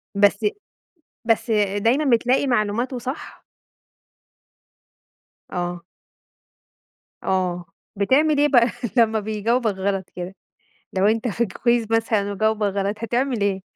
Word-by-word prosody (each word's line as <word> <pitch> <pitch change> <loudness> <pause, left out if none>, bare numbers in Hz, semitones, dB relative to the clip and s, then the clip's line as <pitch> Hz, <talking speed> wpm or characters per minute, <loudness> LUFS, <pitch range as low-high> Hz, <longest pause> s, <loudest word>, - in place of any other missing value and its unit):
بس 205 +1 +3 0.8
بس 225 0 +1 0.3
دايمًا 250 +9 +2
بتلاقي 255 +4 +1
معلوماته 240 +2 0
صح؟ 260 +5 -7 2.1
آه. 175 -1 -3 1.4
آه، 180 -2 -1 0.3
بتعمل 285 +9 +3
إيه 295 - +5
بقى 245 -4 +5 0.3
لمّا 220 -1 +4
بيجاوبك 220 +2 0
غلط 190 -1 -2
كده؟ 180 +2 -6 0.6
لو 190 +1 +1
أنت 225 +2 +1
في 235 +2 0
كويز 235 +3 0
مثلًا 220 -3 +1
وجاوبك 220 0 +1
غلط 200 +1 -1
هتعمل 240 0 -1
إيه؟ 195 -1 0
220 Hz, 105 wpm, -22 LUFS, 200-240 Hz, 2.1 s, إيه